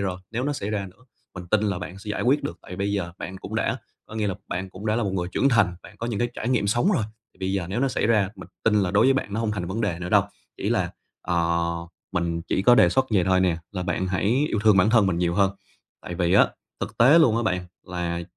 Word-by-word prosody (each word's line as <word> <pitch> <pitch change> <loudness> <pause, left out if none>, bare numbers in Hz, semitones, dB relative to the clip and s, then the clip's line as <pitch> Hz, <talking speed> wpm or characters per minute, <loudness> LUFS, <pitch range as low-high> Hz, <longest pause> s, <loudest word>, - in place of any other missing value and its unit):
rồi, 95 -2 -2
nếu 120 +3 -2
nó 145 - 0
xảy 105 -7 -4
ra 100 -2 -2
nữa, 95 +8 -24 0.3
mình 90 -1 -8
tin 105 +3 +2
là 100 -4 0
bạn 90 +1 -7
sẽ 105 +1 -7
giải - - -2
quyết 135 +4 +3
được, 85 - -5
tại 90 - -9
bây 100 +1 -1
giờ 85 -4 -2
bạn 95 - -6
cũng - - -8
đã - - 0 0.3
có - - -11
nghĩa 110 -1 0
là 95 - -1
bạn 95 +1 -4
cũng 100 +4 -8
đã 110 +1 +2
là 120 - 0
một 100 -3 -1
người 90 -2 -2
trưởng 140 - +3
thành, 100 -7 +3
bạn 105 - -14
có 115 - -4
những 115 -4 -2
cái 120 - +1
trải 115 - -3
nghiệm 120 -5 +1
sống 120 - +2
rồi, 155 - +1 0.3
thì - - -27
bây 95 0 -1
giờ 95 -3 -1
nếu 105 +6 -2
nó 135 - +2
xảy 125 - 0
ra, 105 -4 +3
mình - - -11 0.2
tin 110 -2 +3
là 90 - 0
đối 105 +5 +4
với 135 - +6
bạn 105 -6 -2
nó 110 - -1
hông 115 -2 0
thành 100 -4 -3
vấn 95 +6 -3
đề 100 -6 -1
nữa 90 0 -5
đâu. - - +5 0.3
Chỉ - - -3
là, - - +1 0.3
ờ, 85 -1 +1 0.5
mình 85 -2 -1
chỉ 95 - -1
có 120 +3 +7
đề - - +6
xuất 130 0 +2
vậy 95 -5 +3
thôi 95 -1 +3
nè, 90 -3 +2 0.2
là 90 -2 -3
bạn 90 +1 -1
hãy 105 +9 +1
yêu 105 - -1
thương 105 -2 +6
bản 100 +3 +4
thân 110 -4 +5
mình 85 -3 0
nhiều 85 -1 +1
hơn, 100 -1 +3 0.5
tại 90 - -6
vì 85 0 +1
á - - +6 0.3
thực - - -5
tế 135 +8 +7
luôn 120 -9 +5
á 115 - +1
bạn 90 -5 -1 0.2
là 85 -1 -3
100 Hz, 290 wpm, -24 LUFS, 90-115 Hz, 0.5 s, có